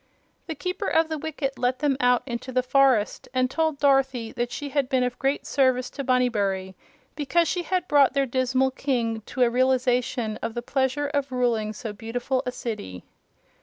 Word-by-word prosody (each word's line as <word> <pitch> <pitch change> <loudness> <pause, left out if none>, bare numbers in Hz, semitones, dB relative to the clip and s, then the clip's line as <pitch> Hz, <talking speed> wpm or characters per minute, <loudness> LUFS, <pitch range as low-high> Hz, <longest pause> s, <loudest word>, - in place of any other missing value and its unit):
The 320 - -4
Keeper 365 +5 -3
of 320 0 +2
the 315 - -2
Wicket 280 -3 -4
let 250 +1 +1
them 290 -1 +1
out 245 -1 +3
into 250 0 -5
the 255 0 +1
forest 255 -4 +2
and 255 0 +2
told 320 -2 0
Dorothy 270 -5 +2
that 240 0 -3
she 290 - -5
had 275 -2 0
been 260 -3 +2
of 250 -1 -3
great 275 +1 0
service 260 -2 +1
to 280 - -5
Bunnybury 205 -7 0 0.4
because 320 +3 +1
she 360 - -1
had 360 0 -1
brought 285 -3 +4
their 275 -1 +3
dismal 260 +1 +1
King 235 -5 -1
to 255 - +1
a 240 - +4
realization 250 -3 +1
of 230 - -4
the 240 - -3
pleasure 265 +2 0
of 285 -1 -2
ruling 235 -4 0
so 220 0 -6
beautiful 245 +4 -2
a - - 0
city. 95 - -6
255 Hz, 185 wpm, -25 LUFS, 240-280 Hz, 0.4 s, brought